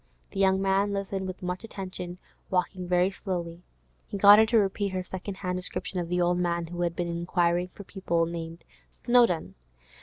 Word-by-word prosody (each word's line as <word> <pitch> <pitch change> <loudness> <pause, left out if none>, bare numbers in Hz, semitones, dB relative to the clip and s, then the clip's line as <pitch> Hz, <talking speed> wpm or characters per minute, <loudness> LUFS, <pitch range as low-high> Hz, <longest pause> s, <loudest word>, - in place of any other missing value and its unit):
The 195 - -5
young 190 -1 +4
man 195 +1 +1
listened 195 -1 -3
with 185 0 -7
much 180 +2 -3
attention, 185 -4 -6 0.3
walking 180 0 -1
very 180 +1 +2
slowly. 175 -3 -5 0.5
He - - -5
got 205 +1 +9
her 220 - +5
to 230 - +3
repeat 200 -1 0
her 185 0 -2
second 190 +2 -6
hand 180 -1 -3
description 180 0 -1
of 170 -1 -4
the 180 0 0
old 175 0 +2
man 170 -1 0
who 175 +1 -6
had 170 -1 0
been 175 - -2
inquiring 170 +1 0
for 200 - -12
people 170 -4 -1
named 165 0 -6 0.3
Snowdon. 240 -9 +2
180 Hz, 185 wpm, -27 LUFS, 175-195 Hz, 0.5 s, got